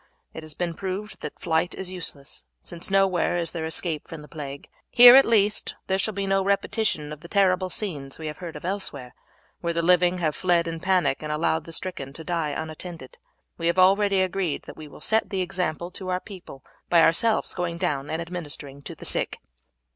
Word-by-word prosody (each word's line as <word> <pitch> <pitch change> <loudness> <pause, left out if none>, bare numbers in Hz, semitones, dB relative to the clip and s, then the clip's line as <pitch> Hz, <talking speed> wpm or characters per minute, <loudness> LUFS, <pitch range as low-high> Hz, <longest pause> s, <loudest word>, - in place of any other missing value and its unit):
It 160 - -7
has 155 -1 -6
been 175 -1 -2
proved 195 +4 -5
that 150 - -7
flight 165 +1 0
is 190 -1 -4
useless, 145 - -4 0.2
since 170 - -5
nowhere 195 -3 +2
is 170 -2 -1
there 165 -2 -4
escape 160 -1 -1
from 160 -2 -8
the - - -12
plague; 140 -3 -7 0.2
here, 245 0 +10
at 270 - +8
least, 210 -2 +2
there 190 0 0
shall 215 +1 -1
be 200 0 -1
no 195 0 +2
repetition 200 -6 0
of 150 - -10
the 170 - -11
terrible 185 -1 +2
scenes 150 -10 -3
we 160 - -7
have 150 +1 -5
heard 170 -4 -7
of 150 - -8
elsewhere, 160 -10 -3 0.5
where 170 -1 -1
the 170 0 0
living 180 +1 +4
have 155 -4 0
fled 175 -2 +2
in 165 0 -4
panic 185 -5 +1
and 150 -1 -4
allowed 155 0 0
the 165 - -9
stricken 160 -6 -4
to 160 - -6
die 165 -2 -1
unattended. 160 -1 -7 0.4
We 165 - 0
have 170 - +1
already 195 +1 +5
agreed 185 -4 -1
that - - -10
we 155 - -10
will - - -14
set 220 0 +1
the 195 -3 -1
example 175 -2 -2
to 185 0 -5
our 180 0 0
people 185 -10 -11 0.3
by 170 -2 +6
ourselves 220 +7 +3
going 175 -2 -2
down 140 -4 -1
and 160 - -2
administering 150 -5 -6
to - - -8
the - - -11
sick." - - -1
175 Hz, 205 wpm, -25 LUFS, 155-190 Hz, 0.5 s, here